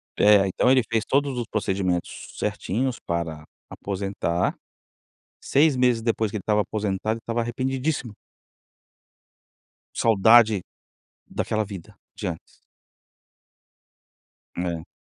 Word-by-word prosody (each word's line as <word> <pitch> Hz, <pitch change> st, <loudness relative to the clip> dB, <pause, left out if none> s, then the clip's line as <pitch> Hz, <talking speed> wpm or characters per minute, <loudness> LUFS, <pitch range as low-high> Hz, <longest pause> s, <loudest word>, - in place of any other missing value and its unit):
É 100 Hz, -1 st, +5 dB
então 95 Hz, +6 st, +1 dB
ele 130 Hz, -1 st, +5 dB
fez 110 Hz, -1 st, +1 dB
todos 140 Hz, -1 st, +1 dB
os 120 Hz, -, -2 dB
procedimentos 95 Hz, -4 st, -2 dB
certinhos 125 Hz, +5 st, -2 dB
para 85 Hz, -3 st, -4 dB, 0.3 s
aposentar, 95 Hz, -3 st, -2 dB, 0.9 s
6 145 Hz, 0 st, +3 dB
meses 125 Hz, -2 st, +2 dB
depois 110 Hz, -1 st, 0 dB
que 110 Hz, -, -3 dB
ele -, -, -6 dB
estava 105 Hz, +2 st, +2 dB
aposentado 105 Hz, +1 st, -2 dB
ele -, -, -11 dB
estava 115 Hz, 0 st, -1 dB
arrependidíssimo. 130 Hz, +1 st, -2 dB, 1.8 s
Saudade 110 Hz, -1 st, +5 dB, 0.6 s
daquela 110 Hz, 0 st, -2 dB
vida 95 Hz, -4 st, -10 dB, 0.2 s
de -, -, -4 dB
antes. 85 Hz, -2 st, -8 dB, 1.9 s
É. 85 Hz, -2 st, -3 dB
110 Hz, 105 wpm, -24 LUFS, 95-120 Hz, 1.9 s, É